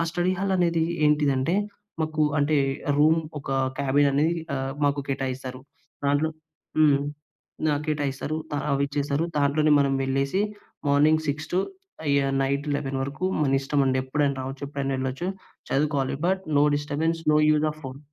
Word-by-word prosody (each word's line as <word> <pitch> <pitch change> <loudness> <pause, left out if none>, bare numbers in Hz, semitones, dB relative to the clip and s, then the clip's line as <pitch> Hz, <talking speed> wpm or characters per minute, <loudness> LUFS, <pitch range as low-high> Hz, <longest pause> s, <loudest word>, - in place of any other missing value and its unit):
ఆ - - +3
study 175 +2 +1
hall 195 0 0
అనేది 170 -2 +2 0.2
ఏంటిదంటే, 150 +1 +2 0.5
మాకు 155 0 0 0.2
అంటే 145 +1 +2 0.4
రూమ్ 160 +2 +5 0.2
ఒక 135 - -7 0.3
క్యాబిన్ 140 +1 +3
అనేది 155 +5 +2 0.2
ఆహ్, 135 0 -2
మాకు 145 0 +2
కేటాయిస్తారు. 130 -1 -3 0.5
దాంట్లో 145 +3 +2 0.5
హ్మ్. 145 -3 +5 0.7
ఆ - - 0
కేటాయిస్తారు. 145 0 -2
త 145 - -4 0.2
అవి 140 0 +1
ఇచ్చేసారు. 145 +2 -1
దాంట్లోనే 145 +2 +2
మనం 140 -1 +2
వెళ్ళేసి 135 +7 0 0.5
మార్నింగ్ 150 +3 +4
6 155 +3 -2
టూ 185 - +3 0.6
యాహ్! 135 -1 +1
నైట్ 140 +2 -1
11 135 -1 -2
వరకు 140 +7 -4 0.2
మన 135 -2 +3
ఇష్టం 140 +1 0
అండి. 130 0 +2
ఎప్పుడైనా 140 +1 0
రావచ్చు. 135 +2 -6
ఎప్పుడైనా 140 -1 -2
ఎళ్ళొచ్చు. 130 +7 -2 0.4
చదువుకోవాలి. 140 -2 +1
But, 190 +1 0 0.2
no - - +5
disturbance, 155 +3 -1
no 150 - +5
use 155 0 +3
of 155 0 -11
phone. 130 +1 -7
145 Hz, 150 wpm, -25 LUFS, 135-155 Hz, 0.7 s, రూమ్